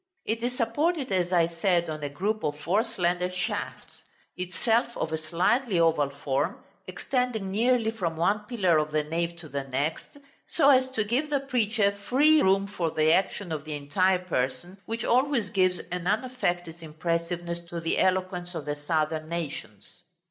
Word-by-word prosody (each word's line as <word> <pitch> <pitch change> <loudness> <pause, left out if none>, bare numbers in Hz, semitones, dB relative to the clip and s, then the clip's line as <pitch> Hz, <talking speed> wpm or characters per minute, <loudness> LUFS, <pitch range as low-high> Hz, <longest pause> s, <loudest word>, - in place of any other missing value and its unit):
It 225 +1 -1
is 250 +1 -2
supported, 285 +5 0
as 180 -1 +1
I 175 -2 +4
said, 170 +1 +1
on 155 -1 -5
a 145 - -3
group 205 +9 -2
of 145 0 -2
four 185 +8 +1
slender 180 -5 -1
shafts; 180 -1 -4 0.3
itself 225 +6 0
of 160 - -2
a 160 - 0
slightly 180 +7 +1
oval 160 -4 +3
form, 140 +4 -2 0.2
extending 250 -7 -2
nearly 230 +2 +2
from 175 -8 -3
one 200 +6 +2
pillar 185 -10 +2
of 150 0 -1
the 155 0 0
nave 170 +2 -2
to 160 - -10
the 140 -2 -3
next, 140 - -3 0.3
so 285 -3 +5
as 260 -1 +4
to 220 - +1
give 250 +8 -1
the 285 -2 +1
preacher 225 -6 +1
free 275 +10 +3
room 195 +1 +3
for 190 -5 -2
the 155 +1 +3
action 190 -1 0
of 155 -2 -3
the 155 -1 -5
entire 180 +7 +2
person, 175 +5 -2
which 230 +1 -3
always 250 -4 +2
gives 185 -2 +2
an 180 0 -3
unaffected 175 -7 -1
impressiveness 170 +2 -3
to 170 0 -5
the 165 0 -1
eloquence 185 -1 0
of 155 -3 -5
the 145 0 -2
southern 155 +1 -1
nations. 170 -4 -6
180 Hz, 170 wpm, -27 LUFS, 160-225 Hz, 0.3 s, so